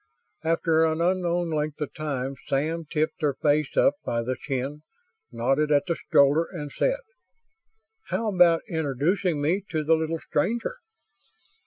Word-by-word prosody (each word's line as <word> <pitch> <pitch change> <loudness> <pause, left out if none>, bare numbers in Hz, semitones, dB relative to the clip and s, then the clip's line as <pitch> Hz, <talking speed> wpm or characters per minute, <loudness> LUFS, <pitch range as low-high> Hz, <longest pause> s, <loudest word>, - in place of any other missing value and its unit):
After 160 0 +2
an 160 0 +1
unknown 175 -1 +1
length 150 -1 -2
of 150 - -4
time 140 -4 -3
Sam 160 +4 -1
tipped 155 0 -1
her 145 -3 +1
face 150 -1 +1
up 275 - +5
by 115 0 -1
the 130 +2 -2
chin, 135 +2 -4 0.5
nodded 135 +6 +1
at 145 -1 +4
the 170 -2 -1
stroller, 145 +4 +3
and 150 -6 -6
said, - - 0 1.1
"How 220 -2 -1
about 175 -2 +5
introducing 160 - 0
me 170 +7 +1
to 155 -2 -1
the 160 +2 +3
little 160 0 0
stranger?" 225 - -1
155 Hz, 145 wpm, -26 LUFS, 145-170 Hz, 1.1 s, up